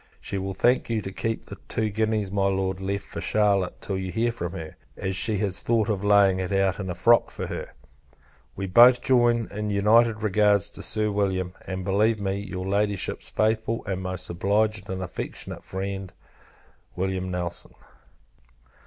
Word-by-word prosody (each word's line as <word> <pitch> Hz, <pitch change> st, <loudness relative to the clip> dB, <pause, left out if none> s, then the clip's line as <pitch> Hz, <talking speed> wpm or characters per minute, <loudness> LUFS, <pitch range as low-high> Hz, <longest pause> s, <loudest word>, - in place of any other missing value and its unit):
She 100 Hz, -, -4 dB
will 95 Hz, 0 st, -4 dB
thank 120 Hz, +6 st, +2 dB
you 115 Hz, -1 st, 0 dB
to 95 Hz, -, -5 dB
keep 115 Hz, +3 st, -3 dB
the -, -, -9 dB
two 110 Hz, -1 st, -1 dB
guineas 110 Hz, -2 st, 0 dB
my 100 Hz, -1 st, +1 dB
Lord 95 Hz, -1 st, -1 dB
left 100 Hz, +1 st, -2 dB
for 85 Hz, -, -7 dB
Charlotte, 100 Hz, -1 st, +1 dB
till 95 Hz, -2 st, -3 dB
you 95 Hz, -1 st, -4 dB
hear 115 Hz, +3 st, +1 dB
from 85 Hz, -7 st, -5 dB
her; 80 Hz, -1 st, -7 dB, 0.2 s
as 95 Hz, 0 st, -2 dB
she 105 Hz, +3 st, +2 dB
has 100 Hz, -2 st, -1 dB
thought 115 Hz, -1 st, +1 dB
of 100 Hz, -2 st, -1 dB
laying 100 Hz, -2 st, +4 dB
it 95 Hz, 0 st, -3 dB
out 95 Hz, 0 st, +1 dB
in 95 Hz, -2 st, -4 dB
a 90 Hz, -, -3 dB
frock 115 Hz, +7 st, +4 dB
for -, -, -5 dB
her. -, -, -6 dB, 0.8 s
We 95 Hz, -, -4 dB
both 120 Hz, +6 st, +6 dB
join 120 Hz, -3 st, +3 dB
in 105 Hz, +1 st, -3 dB
united 110 Hz, +2 st, +3 dB
regards 105 Hz, -1 st, +3 dB
to -, -, -7 dB
Sir 105 Hz, -1 st, 0 dB
William; 95 Hz, -3 st, -1 dB
and 95 Hz, -1 st, -4 dB
believe 105 Hz, +3 st, +2 dB
me, 100 Hz, 0 st, -2 dB
your 95 Hz, -2 st, -5 dB
Ladyship's 100 Hz, 0 st, -1 dB
faithful 110 Hz, +1 st, 0 dB
and 95 Hz, -1 st, -3 dB
most 95 Hz, -1 st, -4 dB
obliged 100 Hz, +3 st, 0 dB
and 95 Hz, 0 st, -3 dB
affectionate 90 Hz, -, -6 dB
friend, 95 Hz, 0 st, -5 dB, 0.9 s
Wm. 95 Hz, 0 st, -2 dB
NELSON. 90 Hz, -1 st, -5 dB
100 Hz, 175 wpm, -25 LUFS, 95-110 Hz, 0.9 s, both